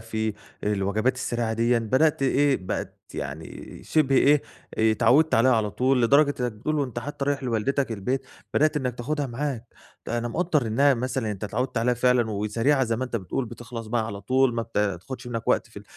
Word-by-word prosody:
في 110 -1 -3 0.3
الوجبات 105 +4 +1
السريعة 120 -3 -2
ديًِّا، 115 +1 +2
بدأْت 130 +7 +2
إيه 135 +1 +3
بقت 90 - -5 0.2
يعني 70 +3 -7
شِبه 140 -4 +2
إيه 145 +2 +5 0.4
آآ، 110 0 +4
اتعوّدت 130 +8 +4
عليها 130 +3 +5
على 105 -2 0
طول، 130 +3 +2
لدرجة 140 +4 +4
إنّك 125 -1 -1
بتقول 150 +9 -2
وأنت 125 -4 -2
حتّى 140 +3 -4
رايح 140 -1 -1
لوالدتك 125 +2 0
البيت 130 +6 -2 0.3
بدأت 155 0 +3
إنّك 130 -4 -1
تاخدها 145 +4 -2
معاك. 130 -1 -4 0.4
أنا 120 0 -1
مقدّر 160 -2 0
إنّها 135 +6 +3
مثلًا 125 -2 -2
أنت 105 0 -5
اتعوّدت 125 +3 -2
عليها 125 +2 +2
فعلًا 125 -2 +2
وسريعة 115 +7 +1
زي 115 -1 -1
ما 130 - -2
أنت 125 -2 -3
بتقول، 115 +6 -3
بتخلص 115 0 -8
بقى 110 0 -1
على 100 -3 -6
طول، 130 +4 +2
ما 115 - -1
بتا 105 -4 -1
تاخدش 125 +9 -9
منك 115 -2 -4
وقت - - +2
في - - -11
120 Hz, 190 wpm, -25 LUFS, 110-135 Hz, 0.4 s, إيه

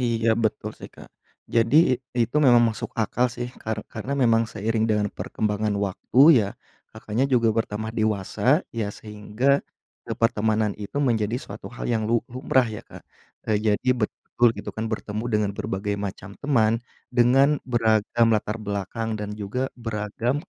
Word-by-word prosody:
Iya, 115 -2 0 0.2
betul 110 - -1
sih - - -9
Kak, - - -13 0.5
jadi 115 +5 +3 0.2
i - - +5 0.3
itu 125 - -5
memang 120 -1 +7
masuk 110 - -5
akal 125 +4 +1
sih 120 0 -3 0.2
kar 110 0 -3
karena 120 +5 -4
memang 115 -1 +4
seiring 110 +1 0
dengan 105 -1 +1
perkembangan 105 0 -1
waktu 100 +6 -4 0.2
ya 100 - -1 0.5
Kakaknya, 110 +3 -2
juga 115 -2 +4
bertambah 110 -1 -2
dewasa 105 -2 -1 0.4
ya 110 - +1
sehingga 105 +3 -5 0.6
ke - - -5
pertemanan 110 -2 +2
itu 100 - -7
menjadi 110 -1 0
suatu 100 +2 -9
hal - - -5
yang 115 -2 +1
lu 115 0 +3
lumrah 130 0 +1
ya, 110 -1 -6
Kak. - - -11 0.5
Nah 105 - +3
jadi 105 +4 +1
betul 120 +2 +1
gitu - - -7
kan 110 - -2
bertemu 110 +1 -4
dengan 105 -1 +1
berbagai 100 +2 -2
macam 100 -1 -6
teman, 115 -7 +2 0.4
dengan 130 +4 +5 0.2
beragam 115 0 +3
latar 105 +1 -1
belakang 100 +2 -3
dan 105 0 -5
juga 125 +7 -3
beragam, 110 +3 -2
110 Hz, 155 wpm, -24 LUFS, 105-120 Hz, 0.6 s, memang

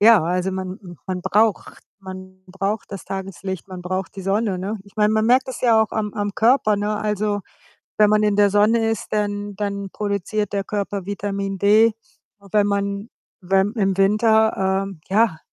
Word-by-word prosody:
ja, 215 -3 +7
also 180 +2 0
man 185 0 -5
m 175 -2 -11
man 185 -1 -3
braucht 210 +3 +1 0.2
man 185 -1 -10
braucht 195 +3 -3
das 195 -3 -7
Tageslicht, 190 -1 -6
man 180 -1 -8
braucht 185 +1 -4
die 195 - -6
Sonne, 195 0 0
ne? 205 +4 -4
Ich 200 - -20
meine, 210 0 +3
man 220 0 +2
merkt 255 +2 +4
das 260 - -6
ja 230 -3 +4
auch 220 - -4
am 210 -2 -2
am 205 0 -1
Körper, 225 -3 +3
ne? 210 +1 -1
Also, 210 -1 -1 0.6
wenn 210 -1 +6
man 215 0 +3
in 210 -1 +2
der 205 0 +5
Sonne 225 +3 +3
ist, 225 - -3
dann 205 -1 -2
dann 200 -1 -3
produziert 205 0 -2
der 195 - -1
Körper 200 -2 -3
Vitamin 195 -1 -3
D. 215 +3 +5 0.6
Wenn 210 -1 +4
man 200 +1 -2 0.3
wenn 195 +3 +2
im 195 -4 +1
Winter, 205 -1 +3
ähm, 195 -5 -9
ja, 205 -4 +3
200 Hz, 180 wpm, -21 LUFS, 190-215 Hz, 0.6 s, ja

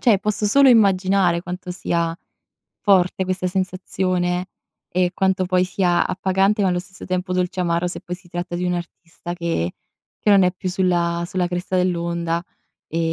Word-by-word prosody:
cioè, 220 -6 +4 0.2
solo 275 +7 +5
immaginare 195 -5 +4
quanto 180 0 -6
sia 170 -2 -1 0.7
forte 190 -2 +3
questa 185 0 -2
sensazione 185 -1 -1 0.4
e 180 0 +1
quanto 190 -1 +1
poi 180 0 +2
sia 180 -1 +1
appagante, 195 +3 +1
ma 190 - +3
allo 180 -1 +1
stesso 190 +1 -10
tempo, 185 0 -2
dolceamaro 180 -1 0
se 175 - -5
poi 180 -2 -6
si 180 -1 -20
tratta 175 0 -5
di 175 +1 -2
un 180 0 0
artista 175 0 -7
che 170 - -2 0.5
che - - -1
non 200 -1 +6
è 180 0 +3
più 185 0 -5
sulla 175 -2 +1
sulla 180 0 -1
cresta 180 +1 -3
dell'onda, 170 -1 -1 0.4
ehm 165 - -3
180 Hz, 160 wpm, -21 LUFS, 175-190 Hz, 0.7 s, non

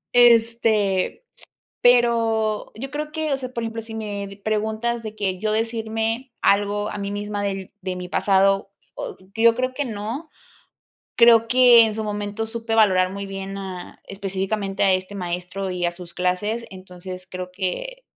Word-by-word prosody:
Este, 230 - +4 0.6
pero 230 -3 +3
yo 265 +5 -6
creo 300 +1 -4
que 315 -1 -1
o 275 - +2
sea, 255 -1 -7
por 235 - -3
ejemplo, 225 0 -4
si 225 0 -9
me 200 -2 -5
preguntas 220 +2 -1
de 215 -1 -6
que, 195 -3 -1
yo 215 +2 0
decirme 225 +2 -2
algo, 205 +1 +2
a - - -5
mí 200 0 -3
misma 205 0 -3
del 195 -1 -3
de 185 -1 -3
mi 180 0 -6
pasado, 195 +1 +2 0.6
yo 230 0 +5
creo 255 +1 -1
que 285 +2 -2
no. 230 +7 -5 0.9
Creo 230 -1 +7
que 245 -1 +7
en 220 -1 -1
su 220 - -3
momento, 210 +1 -3
supe 225 0 -3
valorar 185 -4 +4
muy 200 0 -5
bien 195 0 -6
a 190 -2 -8
específicamente, 195 0 -3
a 195 - +5
este 185 +2 -2
maestro, 180 +1 -4
y 180 -1 -2
a 175 - -1
sus 175 -1 -11
clases. 185 +6 -1
Entonces, 185 -1 -9
creo 180 0 -6
que, - - -4
210 Hz, 160 wpm, -23 LUFS, 195-230 Hz, 0.9 s, Creo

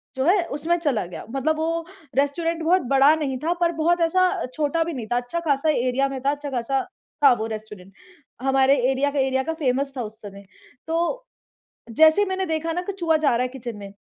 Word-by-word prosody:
जो 265 - -1
है 365 +2 +4
उसमें 340 +4 +1
चला 280 - 0
गया। 175 - -8
मतलब 295 +4 0
वो 330 +1 -1 0.3
रेस्टोरेंट 330 +4 0
बहुत 360 +3 +3
बड़ा 275 +3 +6
नहीं 275 -5 -2
था 335 +2 +1
पर 340 0 +3
बहुत 345 +2 +2
ऐसा 350 +3 +3 0.3
छोटा 310 +3 0
भी 340 - -4
नहीं 235 -6 -6
था। 240 - +2
अच्छा-ख़ासा 285 +3 -1
एरिया 260 -1 +1
में 270 - -5
था, 275 - +2
अच्छा-ख़ासा 270 -2 -2 0.4
था 275 - +8
वो 220 - -2
रेस्टोरेंट 210 -3 -9 0.5
हमारे 270 +1 +3 0.2
एरिया 280 +2 0
का 285 - -1
एरिया 265 0 +1
का 325 - -2
फ़ेमस 275 -3 -1
था - - -1
उस 220 0 -8
समय। 200 -1 -10 0.4
तो 340 +10 -1 0.7
जैसे 315 - +5
ही - - +1
मैंने 380 0 -2
देखा 325 +1 -2
ना 355 +2 -2
कि 400 - -4
चूहा 325 -2 +2
जा 305 -2 +2
रहा 245 - +1
है 255 - -1
किचन 245 -3 -7
में। 200 -1 -9
285 Hz, 210 wpm, -23 LUFS, 260-330 Hz, 0.7 s, था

